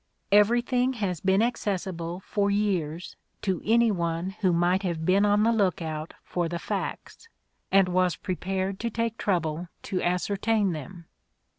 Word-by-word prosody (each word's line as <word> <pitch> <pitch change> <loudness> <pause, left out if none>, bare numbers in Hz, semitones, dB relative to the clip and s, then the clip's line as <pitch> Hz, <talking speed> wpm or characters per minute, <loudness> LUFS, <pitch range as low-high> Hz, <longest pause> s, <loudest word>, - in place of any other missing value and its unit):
Everything 240 +5 +3
has 195 -8 -2
been 195 +3 +3
accessible 185 -6 -2
for 200 +1 0
years 185 -5 -1 0.3
to 190 -4 0
any 230 +1 +4
one 170 0 -2
who 185 -3 +3
might 175 +2 +2
have 170 -4 -2
been 195 +3 +4
on 205 +1 +3
the 230 - +4
look 200 -4 +1
out 155 -1 -5
for 175 -2 -2
the 170 - -3
facts, 460 - -5 0.4
and 195 -1 +5
was 180 -1 +2
prepared 190 +1 -3
to 235 - -1
take 230 0 -2
trouble 170 -3 -1 0.2
to 185 - -2
ascertain 200 +3 +1
them. 170 +2 -7
190 Hz, 150 wpm, -27 LUFS, 175-210 Hz, 0.4 s, and